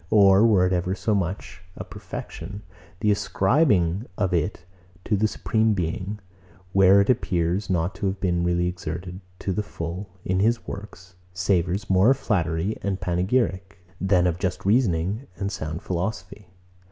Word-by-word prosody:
Or 100 0 +6
were 95 -5 +4
it 90 - +1
ever 90 +1 0
so 110 - -1
much 95 -1 -3
a - - -6
perfection, 100 +5 -8 0.4
the 105 -2 +3
ascribing 105 - +2
of 95 -3 0
it 85 0 -1 0.4
to 105 - +1
the 105 +2 +2
Supreme 110 0 +1
Being, 95 +3 -3 0.6
where 95 +1 +6
it 100 - -1
appears 90 -4 0
not 90 0 0
to 95 - -3
have 95 0 -2
been 85 -2 0
really 85 0 +1
exerted, 90 +1 -5 0.2
to 95 - -3
the 105 - 0
full, 90 0 -6 0.2
in 95 0 0
his 115 +3 +1
works, 95 -2 -9 0.2
savours 90 +1 0
more 95 +4 +4
of 135 - +4
flattery 85 -4 -1
and 100 -1 -2
panegyric, 95 +1 -1 0.2
than 95 -2 +3
of 90 -1 0
just 95 -1 -3
reasoning 100 +1 +1
and 100 0 -2
sound 80 -2 -5
philosophy. 95 +1 -4
95 Hz, 155 wpm, -24 LUFS, 90-105 Hz, 0.6 s, Or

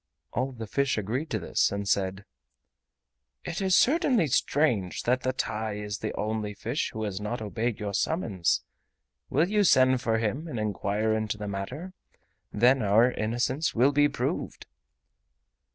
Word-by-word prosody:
All 130 +2 -1
the 115 -3 -7
fish 135 +5 0
agreed 120 +10 -2
to - - -1
this, - - +1
and 100 0 -3
said: 95 +1 0 1.2
"It 175 - -4
is 190 -1 +3
certainly 260 - +4
strange 125 - +1
that 125 +1 +1
the 130 - 0
TAI 110 -4 -3
is 105 -1 -5
the - - -3
only 105 -1 -2
fish 120 +8 -2
who 110 - -4
has 100 -2 -3
not 110 +4 -3
obeyed 110 +1 -2
your 100 -1 -4
summons. 105 - 0 0.7
Will 155 +6 +2
you 210 +1 +2
send 130 -7 +4
for 115 -3 +1
him 115 +9 -2
and 125 -8 -4
inquire 105 +1 0
into 110 -1 -1
the 105 0 -5
matter. 125 - -5 0.6
Then 125 +4 +4
our 110 +4 +4
innocence 120 +8 -1
will 125 +5 +4
be 145 +1 +4
proved." - - -3
115 Hz, 155 wpm, -27 LUFS, 105-135 Hz, 1.2 s, certainly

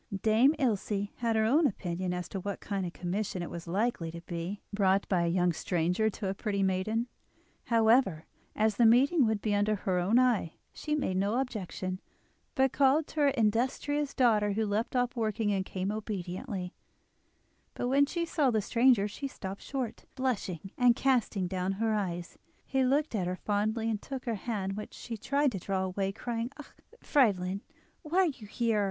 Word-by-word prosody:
Dame 230 +7 +5
Ilse 205 -6 0
had 230 -2 0
her 220 0 +3
own 290 +7 +4
opinion 185 -4 -3
as 180 0 -3
to 195 - -4
what 200 +1 -4
kind 195 -3 -3
of - - -6
commission 185 0 -3
it - - -6
was 170 0 -7
likely 190 -2 0
to 170 +1 -8
be—brought 190 +3 -1
by 175 -3 +2
a - - 0
young 175 0 +2
stranger 180 +6 0
to 205 -1 -5
a 190 - 0
pretty 200 -1 -1
maiden; 195 +5 0 0.6
however, 225 -7 +3 0.3
as 215 -1 +1
the 240 - +5
meeting 265 +4 +5
would 220 -2 -1
be 215 - +1
under 205 +1 +2
her 185 -2 -1
own 195 +7 +3
eye, 240 -10 +2 0.2
she 300 0 -2
made 190 -11 -1
no 200 +5 +1
objection, 185 -6 -4 0.5
but 265 -1 +3
called 280 +3 +4
to 310 - -7
her 290 - +5
industrious 265 +4 0
daughter, 215 -5 +3
who 220 +2 0
left 215 +5 -1
off 250 +1 +1
working 220 -2 0
and 190 -1 -1
came 190 +1 -2
obediently; 190 -3 -4 1.0
but 245 - -2
when 280 +2 +4
she 340 +2 -2
saw 300 -5 +2
the 220 -3 +2
stranger 230 0 +3
she 275 +7 -5
stopped 195 -6 -7
short, 260 -5 -4
blushing, 200 - -2
and 245 -1 +6
casting 235 -8 +1
down 185 +1 -1
her 220 +2 0
eyes. 175 -5 -3 0.3
He 265 -1 +1
looked 280 +3 +1
at 190 -5 0
her 180 - -1
fondly, 215 +3 -1
and 215 -2 -1
took 270 -2 -6
her 235 - -1
hand, 200 -2 -3
which 210 - -7
she 235 - -6
tried 280 +5 +1
to 195 - -4
draw 190 +1 -1
away, 190 +1 -1
crying: 230 +3 -3
"Ah! 300 - -11 0.3
Friedlin, 195 -8 +2 0.4
why 330 +2 -3
are - - +4
you 265 -10 -4
here? 225 0 0
215 Hz, 185 wpm, -30 LUFS, 190-245 Hz, 1.0 s, and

